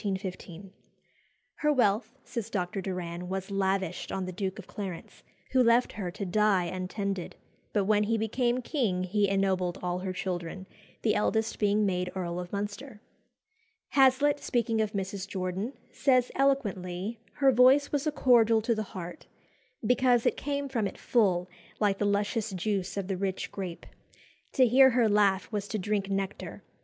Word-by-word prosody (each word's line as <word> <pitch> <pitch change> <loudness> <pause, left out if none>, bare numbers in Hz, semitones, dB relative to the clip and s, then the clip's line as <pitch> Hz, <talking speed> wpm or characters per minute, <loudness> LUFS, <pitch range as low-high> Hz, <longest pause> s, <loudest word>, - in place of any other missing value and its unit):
"Her 300 - +2
wealth," 230 -1 +1
says 230 -3 -5
Dr. 195 -2 -2
Doran, 180 -2 -5
"was 190 +1 -4
lavished 190 -2 -1
on 190 -1 -2
the 185 - -5
Duke 190 +1 -3
of 205 - -9
Clarence, 190 -5 -7 0.3
who 260 - +4
left 235 +1 +4
her 195 -4 -4
to 195 +3 -5
die 200 0 +3
untended; 185 +1 -4 0.4
but 205 -2 +1
when 210 0 +3
he 225 +2 +1
became 240 +3 0
king 220 - 0
he 200 +2 +1
ennobled 190 -2 +1
all 180 0 -1
her 185 0 -3
children, 185 0 -4 0.4
the 215 - +3
eldest 220 +1 0
being 210 0 +2
made 180 -2 -1
Earl 175 -2 -3
of 180 0 -7
Munster." 205 +4 -5 0.9
Hazlitt, 280 +2 +4
speaking 230 -4 0
of 215 0 -1
Mrs. 195 -1 -3
Jordan, 190 +5 -3 0.2
says 255 -3 +2
eloquently, 210 -6 -1
her 275 -2 +4
voice 260 +3 +5
"was 290 +1 0
a - - +2
cordial 230 -5 +4
to 230 +1 +2
the 215 - -2 0.2
heart, 175 -1 -8 0.6
because 245 0 +3
it - - +3
came 285 0 -3
from 235 -6 -1
it - - -9
full, 185 -7 +2 0.3
like 200 -2 +1
the 205 - +1
luscious 205 +3 0
juice 195 0 -2
of 195 -2 -2
the 195 -2 -2
rich 190 0 -3
grape. 185 -4 -6 0.7
To 260 - +5
hear 265 +3 +7
her 240 -2 +3
laugh 200 -2 +2
was 205 -2 -3
to 215 - -2
drink 200 0 -1
nectar. 195 0 -4
205 Hz, 160 wpm, -29 LUFS, 185-235 Hz, 0.9 s, hear